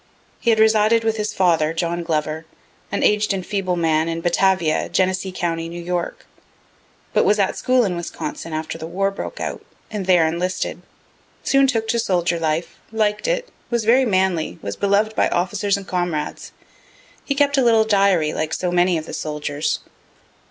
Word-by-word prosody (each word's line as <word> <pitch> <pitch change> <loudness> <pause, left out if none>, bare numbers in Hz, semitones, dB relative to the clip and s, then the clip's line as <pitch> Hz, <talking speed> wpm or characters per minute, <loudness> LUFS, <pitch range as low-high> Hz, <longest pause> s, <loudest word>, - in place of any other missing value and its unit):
He 235 - 0
had 225 - +4
resided 220 +1 +4
with 225 0 0
his 210 0 -2
father, 165 -4 +2
John 170 +1 -1
Glover, 155 -1 -2 0.4
an - - -1
aged 210 0 +3
and 185 -2 -4
feeble 195 -3 -1
man, 160 -1 +1
in 165 0 -3
Batavia, 175 -2 +2
Genesee 190 0 0
county, 165 -2 -2
N. 170 0 -7
Y., 175 -1 +1 1.1
but - - +4
was 210 - +3
at 195 -2 +1
school 255 -2 +2
in 185 -3 -1
Wisconsin, 225 - -5
after 155 +1 -4
the 160 - -6
war 195 +3 0
broke 195 - -6
out, - - -4 0.3
and 205 -4 -4
there 175 -3 +5
enlisted 175 +3 -2 0.6
soon 275 0 +4
took 225 -4 0
to 235 +1 +1
soldier 175 -5 0
life, 160 +1 -2
liked 215 - 0
it, - - -1 0.2
was 235 -3 0
very 250 +4 +5
manly, 185 -6 0
was 100 - -4
belov'd 205 +2 +1
by - - +3
officers 200 +3 0
and 200 - -8
comrades. 175 -5 -3 0.7
He 280 - -2
kept 280 0 +3
a - - +3
little 225 -2 +5
diary, 195 -7 +3
like 155 0 -2
so 180 -1 -2
many 175 0 +3
of 155 - -5
the - - -9
soldiers. 150 -1 -2
185 Hz, 175 wpm, -21 LUFS, 165-215 Hz, 1.1 s, there